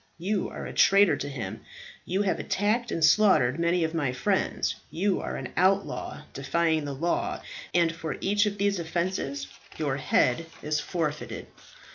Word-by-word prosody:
You 190 +4 -1
are - - -7
a - - -6
traitor 195 -4 +5
to 145 +1 -4
him; 110 -7 -5 0.4
you 190 +3 0
have 190 - 0
attacked 220 +4 0
and 165 - +3
slaughtered 160 -7 +4
many 170 +1 +2
of 160 0 -1
my 145 -6 0
friends; 125 - 0
you 195 +3 0
are - - -4
an - - -5
outlaw 190 -4 +1
defying 160 +2 0
the 140 -1 -4
law; 170 +5 -1 0.3
and 170 -2 +3
for 160 -2 -5
each 205 +2 +2
of 205 0 -3
these 200 -1 +1
offences 170 -4 -2 0.3
your 140 -4 -1
head 145 +3 +2 0.2
is 150 0 0
forfeited." 155 -1 -3
170 Hz, 160 wpm, -27 LUFS, 150-195 Hz, 0.4 s, traitor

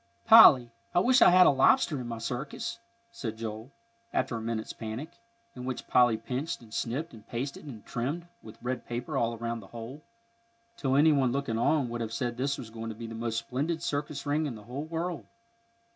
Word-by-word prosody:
"Polly, 135 - +9 0.2
I - - +6
wish 255 +7 +4
I'd - - +9
had 180 0 +7
a - - +7
lobster 135 +1 +3
in 120 - -6
my 115 -1 -4
circus," 125 - -4 0.3
said 115 - -5
Joel, 110 +1 -6 0.4
after 120 - -1
a 115 - -4
minute's 110 -1 -3
panic, 115 +8 -6 0.4
in 125 - -7
which 130 -1 -4
Polly 120 -3 +4
pinched 135 +9 -4
and 110 -2 -15
snipped 135 +9 -3
and 110 -1 -14
pasted 135 +6 -5
and 115 -7 -10
trimmed 140 +8 -3 0.2
with 110 0 -12
red 125 +1 -3
paper 120 +1 -4
all 115 0 +1
around 115 0 -3
the 100 - -13
hole, 120 +7 -9 0.7
till 135 -10 0
any 155 +3 +6
one 135 -4 +2
looking 125 -4 -1
on 140 +2 +2
would 120 0 -4
have 115 -1 -4
said 120 -1 -2
this 135 +3 -1
was 110 - -8
going 115 0 -6
to 110 - -6
be 115 +1 -7
the 115 - -7
most 115 0 -3
splendid 145 +8 -2
circus 145 -1 -3
ring 150 +2 +1
in 130 - -5
the 105 - -11
whole 130 +7 -6
world. 165 0 -4
125 Hz, 205 wpm, -29 LUFS, 115-145 Hz, 0.7 s, Polly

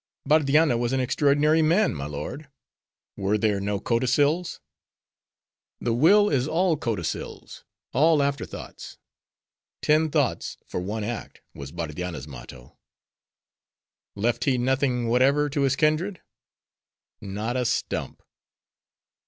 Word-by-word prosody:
"Bardianna 150 -2 +3
was 120 +1 -1
an 135 - +1
extraordinary 145 +4 +3
man, 170 +7 +3
my 70 -3 -5
lord." 75 - -6 0.7
"Were 100 +2 0
there 105 -2 0
no 100 0 -1
codicils?" 140 - +1 1.2
"The 120 - -1
will 200 - +5
is 135 -6 +1
all 170 +2 +2
codicils; 115 - -5 0.3
all 150 +2 +4
after 140 0 -1
thoughts; - - -10 0.9
Ten 155 +1 +3
thoughts 145 -5 -1
for - - -4
one 105 +4 -4
act, 115 +1 -6
was 70 0 -9
Bardianna's 85 0 -5
motto." 65 -2 -12 1.4
"Left 115 +2 0
he 130 -2 +2
nothing 125 -1 0
whatever 135 +5 +3
to 145 - -1
his 135 -1 +2
kindred?" 160 +6 +1 1.0
"Not 105 +5 -4
a 125 - +1
stump." 115 - -3
130 Hz, 115 wpm, -25 LUFS, 105-150 Hz, 1.4 s, will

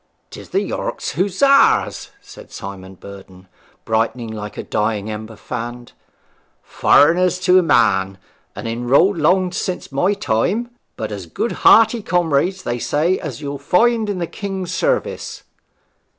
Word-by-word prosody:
''Tis - - -11
the - - 0
York - - -4
Hussars!' 205 - +2
said - - -14
Simon 95 -1 -9
Burden, 95 -1 -13 0.4
brightening 115 +1 -1
like 105 -1 -7
a - - -4
dying 105 0 -2
ember 110 +1 -7
fanned. 120 +1 -7 0.7
'Foreigners 180 +5 +3
to 185 0 +5
a - - +3
man, 95 - +2 0.4
and - - -6
enrolled 130 - +2
long 180 +4 +2
since 180 -2 -4
my 180 +9 +1
time. 200 - -1 0.3
But 110 -1 -4
as 100 -4 -7
good 230 - -3
hearty 225 +1 +5
comrades, 175 +1 0
they 120 0 -3
say, 160 +9 0
as 145 -4 -7
you'll 140 -1 -5
find 220 - +2
in 200 - -2
the 175 - -2
King's 190 -1 -5
service.' - - -2
145 Hz, 135 wpm, -19 LUFS, 110-185 Hz, 0.7 s, to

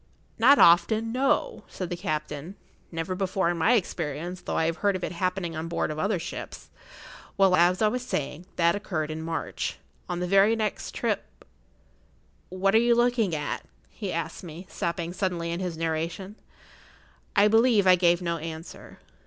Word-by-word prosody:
"Not 270 +5 +7
often—no," 225 - +3
said 185 -2 -6
the - - -1
captain; 155 0 -4 0.4
"never 165 +2 -3
before 185 -2 0
in 175 - -4
my 220 +9 +4
experience, 175 - -2
though - - -3
I 160 - +2
have 165 +1 -1
heard 200 -1 +1
of 185 - -5
it[Pg - - -1
62] 170 - -9
happening 180 -2 -1
on 160 +1 -4
board 170 - -1
of 155 - -5
other 200 +4 +1
ships. 165 - -7 0.7
Well, 190 -2 +5
as 180 +4 +3
I - - +5
was 250 +4 -1
saying, 160 - -4
that 170 0 +3
occurred 155 -7 -3
in 155 +1 -5
March. 165 0 -3 0.3
On 175 -1 -2
the 180 - -1
very 195 +4 +4
next 215 -1 -3
trip—What 190 +1 -5
are 220 - +6
you 235 0 +4
looking 240 -7 +2
at?" 150 -1 -3 0.3
he - - -5
asked, - - -4 0.3
stopping 170 0 -3
suddenly 180 -3 -2
in 170 - -3
his 180 -3 -4
narration. 165 +5 -3 1.0
I 205 0 +6
believe 225 -1 +4
I 185 - +7
gave 175 -1 +3
no 170 -1 -1
answer. 160 +1 -8
180 Hz, 170 wpm, -26 LUFS, 165-205 Hz, 1.0 s, Not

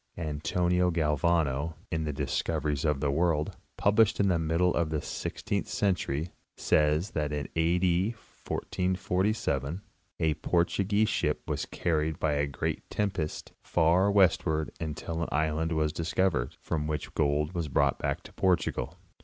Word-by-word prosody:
'? - - -41
Antonio 85 +3 +1
Gal 80 -3 +1
vano, 80 -2 +1 0.2
in 80 -1 -1
'The 75 - -2
Discoveries 75 +1 -1
of 75 -3 +1
the 70 - +1
World," 80 0 +1 0.2
published 105 +1 +3
in 100 -1 +3
the 85 -2 +2
middle 85 +3 +2
of 85 -2 0
the 80 -1 -1
sixteenth - - -3
century, 85 -5 -1 0.3
says 75 +5 +2
that 75 -1 -1
in 75 -2 -2
A. 80 +2 +2
D. 90 +2 +2 0.3
1447 90 - -1 0.4
a 80 -1 +2
Portuguese 95 +6 +1
ship 75 -6 0
was - - -2
carried 80 -2 -1
by 80 - +1
a 70 0 +1
great 70 - -3
tempest 95 -7 -2
far 85 +4 +3
westward 90 -6 +3
until 80 +1 -4
an 85 - -2
island 80 +2 0
was 75 -1 +1
discovered, 85 -6 0
from 75 -3 -2
which 75 -1 -3
gold 75 +1 +1
was 85 -4 -2
brought 70 0 +2
back - - -2
to - - -13
Portugal. 90 -2 0
80 Hz, 150 wpm, -29 LUFS, 75-90 Hz, 0.4 s, published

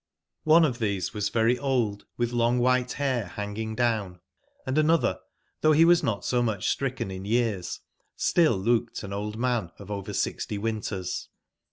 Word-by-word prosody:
One 160 +1 +6
of 130 -5 -2
tbese 100 -4 -1
was 105 -2 -1
very 115 +3 +2
old, 120 -6 0
witb 120 0 0
long 120 +1 +2
Iwbite 125 0 +1
bair 130 -6 -1
banging 105 +2 -4
down; 110 -7 0 0.5
and 130 - -2
anotber, 155 +1 +3 0.4
tbougb 155 0 +5
be 160 +2 +6
was 175 0 +5
not 100 -5 -2
so 125 -1 +1
mucb 110 -5 -1
stricken 130 -7 -1
in 95 0 -6
years, 105 -4 -1 0.3
still 160 - +3
looked 115 +4 0
an 100 -1 -6
old 105 +2 -4
man 120 -6 0
of 100 0 -10
over 100 -2 -4
sixty 105 - -2
winters. 100 -4 -3
115 Hz, 165 wpm, -27 LUFS, 100-125 Hz, 0.5 s, One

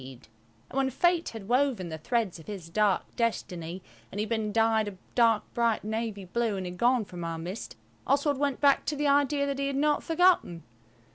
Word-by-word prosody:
And 130 -3 -12 0.4
when 270 0 +1
Fate 345 +5 +2
had 220 -4 -9
woven 245 -7 +1
the 160 - -5
threads 225 -2 -1
of 160 - -14
his 190 -6 -7
dark 210 0 +1
destiny 180 -6 -2 0.3
and - - -7
he 210 - +1
had 215 - -6
been 220 -2 -1
dyed 225 -1 +2
a 200 -2 -7 0.2
dark 230 -3 +4
bright 235 -2 +1
navy 215 -2 -3
blue, 225 +2 -1
and 190 - -4
had 180 0 -6
gone 240 +1 +3
from 175 -3 -8
our 165 0 -3
midst, 180 +6 -6 0.3
Oswald 285 0 +2
went 280 -2 0
back 280 -1 +4
to 300 - -1
the 295 +1 -1
idea 285 0 +3
that 280 -1 -2
he 275 - 0
had 275 - -2
not 295 +1 +2
forgotten. 330 - +2
225 Hz, 205 wpm, -28 LUFS, 190-275 Hz, 0.4 s, dark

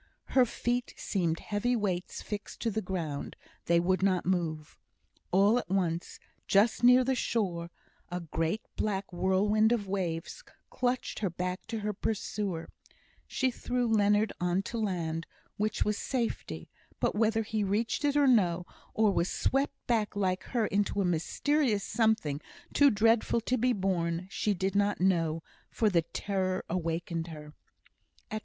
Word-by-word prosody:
Her 255 -2 +5
feet 245 +2 -2
seemed 170 -5 -1
heavy 220 +4 0
weights 190 -5 -2
fixed 210 -1 -6
to 230 - 0
the 220 +2 -1
ground; 170 -7 -4 0.3
they 170 0 +4
would 185 +2 +1
not 190 -2 +2
move. 165 -4 -2 0.5
All 200 +6 +5
at - - -8
once, 175 -3 -1 0.3
just 215 +4 +3
near 250 +1 +7
the 265 +1 +1
shore, 185 -9 -1 0.4
a 180 0 -3
great 165 +4 -2
black 195 -3 -2
whirlwind 205 +5 +3
of 230 -4 +1
waves 185 - -3 0.3
clutched 250 0 -1
her 200 - 0
back 180 +2 -4
to 225 -1 -3
her 210 0 -1
pursuer; 200 -4 -3 0.6
she 260 -1 0
threw 245 0 -1
Leonard 210 -1 +3
on 180 +2 +1
to 230 +3 -4
land, 165 -6 -2 0.3
which 215 +1 0
was 210 0 0
safety; 245 -4 -3 0.3
but - - +1
whether 225 +1 +2
he 215 0 -1
reached 210 +7 0
it 290 0 +2
or 290 - +5
no, 180 -9 +3 0.3
or 215 -2 +4
was 180 -1 +1
swept 275 +2 0
back 220 -4 0
like 185 -2 0
her 235 -4 0
into 205 0 0
a 195 - +2
mysterious 210 - +1
something 220 -13 +1 0.3
too 285 -1 +6
dreadful 225 +1 +3
to 250 - 0
be 250 +1 +2
borne, 180 -4 0
she 205 0 0
did 190 +2 -1
not 205 0 +1
know, 165 -3 +1 0.3
for 215 -2 +1
the 170 -2 +4
terror 185 +2 -2
awakened 170 -1 -2
her. 150 -2 -9
200 Hz, 150 wpm, -30 LUFS, 175-225 Hz, 0.6 s, near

